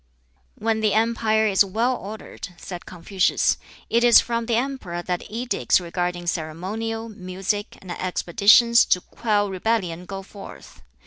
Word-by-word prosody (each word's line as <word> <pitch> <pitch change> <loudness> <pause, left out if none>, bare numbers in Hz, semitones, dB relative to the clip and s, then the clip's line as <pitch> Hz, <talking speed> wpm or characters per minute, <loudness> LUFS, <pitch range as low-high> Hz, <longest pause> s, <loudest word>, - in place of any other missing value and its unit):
"When 220 0 -1
the 215 -1 +2
empire 220 -1 +2
is 200 -2 +4
well 225 +6 0
ordered," 200 -4 -9
said 180 -2 -9
Confucius, 185 +2 +1 0.3
"it 235 +1 +2
is 240 -1 +8
from 235 -1 -2
the 235 - +1
emperor 235 -9 -3
that 180 -1 -4
edicts 235 -1 +1
regarding 175 0 -3
ceremonial, 190 +8 -3
music, 200 0 -4
and 185 - -8
expeditions 200 +7 +4
to 180 - +2
quell 205 -1 -1
rebellion 185 -3 -1
go 195 0 -6
forth. 195 - -12
205 Hz, 135 wpm, -23 LUFS, 180-225 Hz, 0.3 s, is